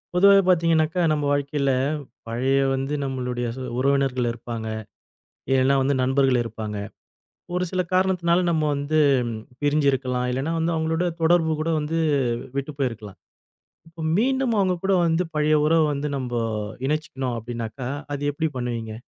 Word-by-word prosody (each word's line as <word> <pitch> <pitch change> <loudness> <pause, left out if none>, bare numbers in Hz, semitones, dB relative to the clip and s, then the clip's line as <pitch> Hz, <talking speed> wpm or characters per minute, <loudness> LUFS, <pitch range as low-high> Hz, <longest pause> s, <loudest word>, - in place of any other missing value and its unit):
பொதுவாவே 200 +2 +7
பார்த்தீங்கனாக்கா, 165 -1 +3
நம்ப 150 -1 0
வாழ்க்கையில 140 -1 0 0.6
பழைய 125 +4 0 0.2
வந்து 135 +2 -3
நம்மளுடைய 125 -2 -3
சு 130 - -5 0.2
உறவினர்கள் 135 -2 +1
இருப்பாங்க. 115 -1 -6 0.8
இல்லன்னா 135 +1 +4
வந்து 140 +2 +1
நண்பர்கள் 130 -1 +3
இருப்பாங்க. 110 -2 -5 0.8
ஒரு 180 0 +1
சில 185 -1 0
காரணத்துனால 185 -2 +2
நம்ம 160 -2 +1
வந்து 145 +2 0 0.6
பிரிஞ்சிருக்கலாம். 135 -4 +1
இல்லைன்னா 135 +6 -1
வந்து 165 +1 0
அவங்களோட 160 +2 0 0.2
தொடர்பு 165 -1 +3
கூட 160 +2 0
வந்து 155 +2 -2 0.6
விட்டு 140 +2 -2
போயிருக்கலாம். 115 -7 -4 0.7
இப்ப 165 0 -8
மீண்டும் 260 +1 +1
அவங்க 185 -2 +2
கூட 195 0 +2
வந்து 165 +2 +2
பழைய 150 0 +3
உறவ 165 +1 +4
வந்து 145 +1 -2
நம்போ 125 -2 -2 0.5
இணைச்சுக்கணும் 135 -4 -2
அப்படின்னாக்கா, 120 +2 -5 0.2
அது 145 - -4
எப்படி 160 +3 -1
பண்ணுவீங்க? 115 -3 -3
140 Hz, 130 wpm, -24 LUFS, 125-165 Hz, 0.8 s, பொதுவாவே